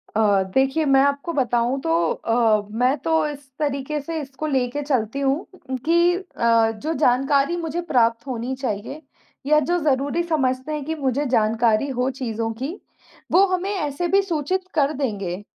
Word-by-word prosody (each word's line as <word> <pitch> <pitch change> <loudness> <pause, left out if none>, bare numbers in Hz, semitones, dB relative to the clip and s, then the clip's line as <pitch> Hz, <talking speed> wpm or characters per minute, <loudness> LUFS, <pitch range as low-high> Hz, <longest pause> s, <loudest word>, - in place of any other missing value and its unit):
अ, 205 -3 +3
देखिए 270 +4 +2
मैं 270 -1 +5
आपको 280 +4 0
बताऊँ 245 -1 +1
तो 165 - 0 0.2
अ, 225 -3 +1
मैं 250 +6 +1
तो 320 +3 +1
इस 285 -2 -8
तरीके 290 0 -2
से 320 +3 -4
इसको 280 +2 -6
लेके 265 0 -1
चलती 260 -3 -1
हूँ 275 0 +2 0.3
उम, 260 - -1
कि 340 +6 +3
अ, 230 - +1
जो 290 +9 -4
जानकारी 275 +3 +2
मुझे 335 0 -3
प्राप्त 240 -6 +1
होनी 255 +1 -3
चाहिए 255 +3 -4 0.4
या 300 +2 +4
जो 345 +5 0
ज़रूरी 285 +2 0
समझते 265 -4 -1
हैं 300 - -3
कि 320 - -2
मुझे 280 -1 -1
जानकारी 225 +2 +2
हो 255 0 0
चीज़ों 230 -3 -3
की, 315 +9 -4 0.5
वो 380 +3 +6
हमें 370 +1 -1
ऐसे 310 -1 -2
भी 390 +3 +4
सूचित 370 +1 -2
कर 295 -1 +2
देंगे, 205 -8 -3
275 Hz, 165 wpm, -22 LUFS, 240-310 Hz, 0.5 s, वो